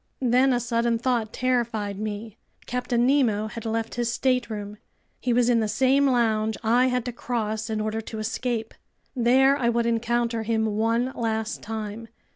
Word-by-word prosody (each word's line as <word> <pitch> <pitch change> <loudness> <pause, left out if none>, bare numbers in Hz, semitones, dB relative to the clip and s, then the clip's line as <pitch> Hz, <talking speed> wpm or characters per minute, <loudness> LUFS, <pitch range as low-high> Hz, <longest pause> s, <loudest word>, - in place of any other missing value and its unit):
Then 255 +2 +4
a 245 - +2
sudden 235 0 0
thought 235 -2 0
terrified 225 -6 -1
me. 215 +1 -5 0.3
Captain 245 -1 0
Nemo 245 -6 +2
had 230 0 -6
left 225 0 -2
his 240 -1 -1
stateroom. 225 -5 -1 0.4
He 250 - -1
was 240 0 +3
in 240 -1 +4
the 220 - 0
same 265 +5 +3
lounge 220 -4 +1
I 240 +3 +4
had 250 -2 -1
to 245 - -2
cross 220 -2 -3
in 220 -1 -1
order 215 +1 -2
to 220 0 -8
escape. 225 +1 -3 0.4
There 260 +3 +4
I 240 -4 +1
would 235 0 +1
encounter 235 0 0
him 220 0 0
one 225 +4 0
last 220 -1 -2
time. 220 +1 -5
230 Hz, 165 wpm, -25 LUFS, 220-245 Hz, 0.4 s, Then